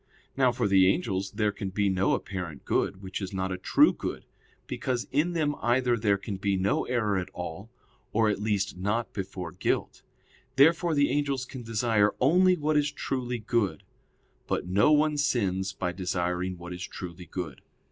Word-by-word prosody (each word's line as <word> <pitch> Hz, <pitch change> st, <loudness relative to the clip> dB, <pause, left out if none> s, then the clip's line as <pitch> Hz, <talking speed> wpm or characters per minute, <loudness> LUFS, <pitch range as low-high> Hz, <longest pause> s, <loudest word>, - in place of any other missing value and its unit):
Now 130 Hz, -2 st, +4 dB
for 120 Hz, -, 0 dB
the 95 Hz, -1 st, +5 dB
angels 100 Hz, -, -2 dB
there 105 Hz, -2 st, +1 dB
can 100 Hz, -1 st, -5 dB
be 100 Hz, +2 st, 0 dB
no 95 Hz, 0 st, +2 dB
apparent 90 Hz, -7 st, -6 dB
good 95 Hz, 0 st, 0 dB
which 95 Hz, +1 st, -5 dB
is 95 Hz, 0 st, -5 dB
not 95 Hz, 0 st, -2 dB
a 90 Hz, -, -2 dB
true -, -, +4 dB
good; -, -, -5 dB, 0.4 s
because 125 Hz, -2 st, -2 dB
in 165 Hz, +5 st, +1 dB
them 155 Hz, -3 st, +1 dB
either 120 Hz, 0 st, +2 dB
there 105 Hz, -3 st, +2 dB
can 100 Hz, 0 st, -5 dB
be 100 Hz, 0 st, 0 dB
no 95 Hz, +1 st, +1 dB
error 105 Hz, -6 st, 0 dB
at 90 Hz, +1 st, -5 dB
all, 90 Hz, +5 st, -6 dB, 0.4 s
or 110 Hz, 0 st, +3 dB
at 105 Hz, -1 st, 0 dB
least 100 Hz, -2 st, 0 dB
not 105 Hz, +5 st, -2 dB
before 95 Hz, -3 st, -5 dB
guilt. -, -, -2 dB, 0.5 s
Therefore 160 Hz, +4 st, +4 dB
the 145 Hz, 0 st, +3 dB
angels 140 Hz, -3 st, 0 dB
can 130 Hz, -1 st, -8 dB
desire 110 Hz, -2 st, +1 dB
only 180 Hz, +7 st, +4 dB
what 155 Hz, 0 st, +1 dB
it 145 Hz, 0 st, +2 dB
truly 125 Hz, -2 st, -2 dB
good. 110 Hz, -7 st, -1 dB, 0.6 s
But -, -, -1 dB
no 100 Hz, +11 st, +3 dB
one 150 Hz, 0 st, +3 dB
sins 95 Hz, -9 st, 0 dB
by 90 Hz, -1 st, -3 dB
desiring 90 Hz, 0 st, -2 dB
what 90 Hz, +1 st, -8 dB
is 90 Hz, -, -8 dB
truly 90 Hz, -1 st, -7 dB
good. 90 Hz, -3 st, -6 dB
105 Hz, 180 wpm, -28 LUFS, 95-130 Hz, 0.6 s, the